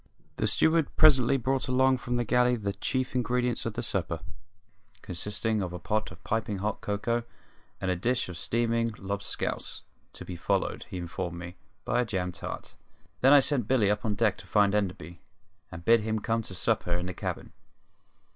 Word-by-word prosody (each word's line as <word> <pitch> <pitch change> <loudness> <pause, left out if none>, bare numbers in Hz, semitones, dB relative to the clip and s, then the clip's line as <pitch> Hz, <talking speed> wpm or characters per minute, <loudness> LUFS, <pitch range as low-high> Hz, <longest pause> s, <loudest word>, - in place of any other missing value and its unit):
The - - +1
steward 160 -2 +2
presently 135 -4 +6
brought 135 +1 0
along 130 0 +3
from 120 0 -2
the 120 - +1
galley 125 +2 +3
the 100 -3 -2
chief 130 +4 -2
ingredients 125 -1 0
of - - -3
the - - -2
supper, - - -2 0.8
consisting 105 +3 -2
of 90 -2 -3
a - - -4
pot 110 +4 -1
of 95 +1 -14
piping 110 -2 -1
hot 105 +2 -2
cocoa 115 +4 -1 0.6
and 95 -1 0
a - - +1
dish 120 +8 0
of 90 - -7
steaming 115 +5 0
"lobscouse", 100 +1 -3 0.3
to - - -8
be 90 - -6
followed, 85 - -1
he - - -5
informed 85 0 -4
me, 85 +1 -8 0.3
by 120 +2 +2
a - - 0
jam 95 -4 -2
tart. - - -7 0.5
Then 135 - +6
I 145 -1 +9
sent 130 -6 +1
Billy 115 -6 +3
up 105 0 -1
on 105 -2 0
deck 105 -2 +1
to - - -12
find 105 -1 +3
Enderby 90 -5 -2 0.5
and 85 -1 -9
bid 115 0 +6
him 110 +1 -1
come 115 +1 0
to 95 -4 -8
supper 100 -2 0
in 90 +1 -1
the 90 - -4
cabin. - - -5
110 Hz, 185 wpm, -28 LUFS, 95-125 Hz, 0.8 s, I